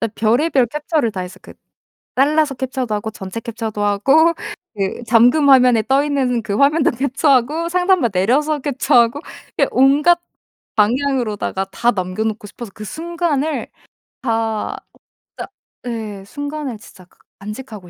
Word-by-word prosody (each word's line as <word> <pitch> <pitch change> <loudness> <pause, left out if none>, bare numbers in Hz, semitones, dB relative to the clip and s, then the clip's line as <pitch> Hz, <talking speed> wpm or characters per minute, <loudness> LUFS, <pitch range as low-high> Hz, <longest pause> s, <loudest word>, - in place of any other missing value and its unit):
진짜 225 -2 -2
별의별 250 +5 +2
캡처를 300 -2 -1
다 185 - -4
했어. 180 +1 -8
그 - - -13 0.6
잘라서 295 +1 +2
캡처도 255 -3 -3
하고 220 +1 -3
전체 190 +1 -7
캡처도 220 -2 -5
하고 275 +12 +4 0.4
그 195 +3 -3
잠금 245 +6 +4
화면에 250 -4 +5
떠 270 +4 +2
있는 265 -5 0
그 205 -2 -3
화면도 285 +2 +3
캡처하고 280 +4 +1
상단 360 +1 +2
막 235 - +1
내려서 280 +11 +1
캡처하고 265 -2 +2 0.4
그 - - +4
온갖 295 +6 +4 0.6
방향으로다가 225 -4 0
다 235 +4 +1
남겨 185 +3 -3
놓고 215 -1 -3
싶어서 215 +2 -9
그 215 - -8
순간을 320 - -2 0.5
다 225 -3 -2 0.6
진짜 - - -6 0.4
예 215 -4 -5
순간을 285 0 -5
진짜 190 -2 -16
가 - - -32 0.2
간직하고 210 -2 -9
245 Hz, 300 characters per minute, -18 LUFS, 215-285 Hz, 0.6 s, 화면에